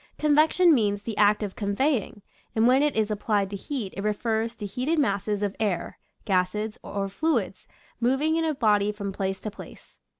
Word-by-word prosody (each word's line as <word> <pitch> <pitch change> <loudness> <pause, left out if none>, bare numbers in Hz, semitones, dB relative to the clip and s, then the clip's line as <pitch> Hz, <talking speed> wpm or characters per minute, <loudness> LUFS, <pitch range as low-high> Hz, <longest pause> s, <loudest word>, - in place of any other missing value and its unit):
Convection 310 +3 +4
means 205 -5 +1
the 225 -1 -4
act 210 +1 +3
of 200 -2 -5
conveying; 205 0 -1 0.3
and 220 0 +3
when 260 +2 +5
it 295 -1 +1
is 215 -1 +1
applied 205 -1 0
to - - -4
heat 220 -1 -4
it 195 - -4
refers 220 +2 -1
to 210 - -6
heated 255 +11 -1
masses 205 -6 0
of 200 -1 -2
air, 205 -5 -2 0.3
gases, 205 +2 0
or 200 -1 -3
fluids 230 - -1 0.3
moving 270 +6 +1
in 330 - +1
a 315 -2 0
body 210 -4 +2
from 200 -2 -5
place 190 0 -2
to 215 - -4
place. - - -13
215 Hz, 180 wpm, -26 LUFS, 200-265 Hz, 0.3 s, when